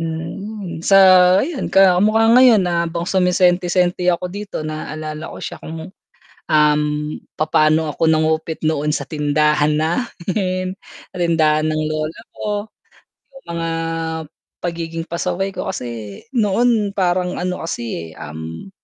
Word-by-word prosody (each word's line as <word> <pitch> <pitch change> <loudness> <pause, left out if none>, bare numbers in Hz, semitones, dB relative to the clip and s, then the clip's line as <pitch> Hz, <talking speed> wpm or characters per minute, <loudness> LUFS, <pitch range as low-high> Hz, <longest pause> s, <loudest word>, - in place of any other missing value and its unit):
Hmm, 170 +4 -5
sa 195 +3 +4 0.5
ayun 330 -6 -4
ka 190 -2 +5
kamukha 215 +2 +3
ngayon 245 -6 +6
habang 170 -1 -1
sumisenti-senti 180 -1 +2
ako 180 0 +1
dito 200 -6 -5
naalala 155 0 -5
ko - - -9
siya - - -7
kung, 160 +3 -8 0.6
um, 150 -1 +4 0.5
papaano 155 0 +2
ako 155 - -1
nangupit 160 0 +1
noon 150 -1 0
sa - - -4
tindahan 150 0 +2
namin 185 +2 -2 0.4
tindahan 160 -3 +2
ng 155 0 0
lola 155 +3 -3
ko, 210 0 -4 0.6
yung 270 - -15
mga 165 0 -2 0.9
pagiging 165 -1 -4
pasaway 180 +3 -2
ko 195 - -4
kasi 115 - -7 0.2
noon 215 -1 +2
parang 180 -2 0
ano 180 -2 -3
kasi, 110 - -5
um, 80 - -8
170 Hz, 120 wpm, -19 LUFS, 155-185 Hz, 0.9 s, ngayon